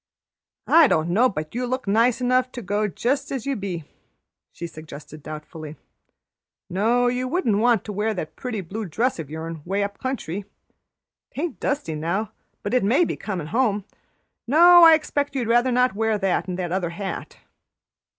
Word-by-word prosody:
"I 330 Hz, -2 st, +6 dB
don't 160 Hz, -6 st, +1 dB
know 240 Hz, +8 st, +4 dB
but 155 Hz, -6 st, -5 dB
you 245 Hz, +1 st, -2 dB
look 255 Hz, -2 st, -3 dB
nice 230 Hz, +5 st, +3 dB
enough 255 Hz, +1 st, +2 dB
to 245 Hz, -, -6 dB
go 205 Hz, +3 st, 0 dB
just 245 Hz, -, -1 dB
as 265 Hz, -5 st, -3 dB
you 275 Hz, -1 st, -1 dB
be," 190 Hz, -6 st, -4 dB, 0.7 s
she 170 Hz, -, -7 dB
suggested 155 Hz, -2 st, -10 dB
doubtfully. 155 Hz, +1 st, -8 dB, 1.0 s
"No, 230 Hz, +7 st, +2 dB
you 250 Hz, +1 st, 0 dB
wouldn't 250 Hz, -, +1 dB
want 235 Hz, -2 st, +3 dB
to 210 Hz, -, -6 dB
wear 210 Hz, +3 st, 0 dB
that 155 Hz, -3 st, -5 dB
pretty 235 Hz, -5 st, -4 dB
blue 210 Hz, +5 st, -5 dB
dress 225 Hz, -, -1 dB
o' -, -, -2 dB
yourn 160 Hz, +1 st, -6 dB
'way 195 Hz, +4 st, -1 dB
up 200 Hz, 0 st, -5 dB
country. 205 Hz, -8 st, -4 dB, 0.9 s
'Taint 320 Hz, +4 st, -3 dB
dusty 280 Hz, -, -2 dB
now, 175 Hz, +8 st, -2 dB, 0.3 s
but -, -, -3 dB
it 250 Hz, -, +3 dB
may 265 Hz, -, +3 dB
be -, -, -3 dB
comin' 185 Hz, -7 st, -4 dB
home. 215 Hz, -5 st, +1 dB, 0.6 s
No, 345 Hz, +6 st, +8 dB
I 325 Hz, -1 st, +9 dB
expect 290 Hz, -2 st, -2 dB
you'd 245 Hz, -4 st, -1 dB
rather 240 Hz, +2 st, +3 dB
not 250 Hz, -1 st, +3 dB
wear 220 Hz, +1 st, 0 dB
that 190 Hz, -3 st, 0 dB
and 180 Hz, -1 st, -3 dB
the 185 Hz, -, -2 dB
other 175 Hz, 0 st, -1 dB
hat." 190 Hz, +3 st, -6 dB
215 Hz, 175 wpm, -23 LUFS, 175-255 Hz, 1.0 s, I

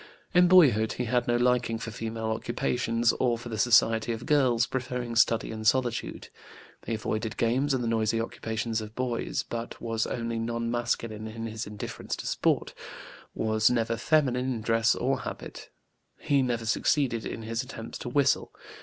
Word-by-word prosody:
In 180 Hz, 0 st, +6 dB
boyhood 135 Hz, -, +5 dB
he 125 Hz, -, -3 dB
had 120 Hz, +1 st, 0 dB
no 120 Hz, -, +2 dB
liking 120 Hz, -1 st, +2 dB
for 115 Hz, 0 st, -6 dB
female 110 Hz, 0 st, -4 dB
occupations, 120 Hz, 0 st, 0 dB
or 120 Hz, -2 st, +2 dB
for 120 Hz, +1 st, -9 dB
the 110 Hz, -, -4 dB
society 115 Hz, -1 st, +4 dB
of 115 Hz, +1 st, -5 dB
girls, 130 Hz, -5 st, +3 dB
preferring 125 Hz, -2 st, -4 dB
study 115 Hz, -1 st, +3 dB
and 110 Hz, -1 st, -3 dB
solitude. 120 Hz, -1 st, 0 dB, 0.6 s
He 115 Hz, -, 0 dB
avoided 110 Hz, 0 st, -3 dB
games 130 Hz, +5 st, +1 dB
and 130 Hz, -2 st, 0 dB
the -, -, -1 dB
noisy 115 Hz, 0 st, +1 dB
occupations 115 Hz, 0 st, -3 dB
of 110 Hz, +1 st, -9 dB
boys, 125 Hz, -2 st, -2 dB
but 115 Hz, 0 st, -6 dB
was 115 Hz, -1 st, -1 dB
only 115 Hz, -1 st, -3 dB
non 115 Hz, 0 st, -2 dB
masculine 115 Hz, -2 st, -2 dB
in 115 Hz, +1 st, -6 dB
his 110 Hz, 0 st, -5 dB
indifference 105 Hz, 0 st, -5 dB
to -, -, -8 dB
sport, -, -, 0 dB, 0.6 s
was 110 Hz, 0 st, +2 dB
never 115 Hz, -1 st, 0 dB
feminine 130 Hz, -2 st, +2 dB
in 115 Hz, -3 st, -3 dB
dress 115 Hz, +1 st, +2 dB
or 130 Hz, +2 st, 0 dB
habit. -, -, -8 dB, 0.5 s
He 140 Hz, -1 st, +2 dB
never 120 Hz, -3 st, -1 dB
succeeded 120 Hz, 0 st, +1 dB
in 115 Hz, -, -5 dB
his 115 Hz, +1 st, -2 dB
attempts 120 Hz, -3 st, -8 dB
to -, -, -5 dB
whistle. 140 Hz, +2 st, +2 dB
115 Hz, 170 wpm, -28 LUFS, 115-125 Hz, 0.6 s, In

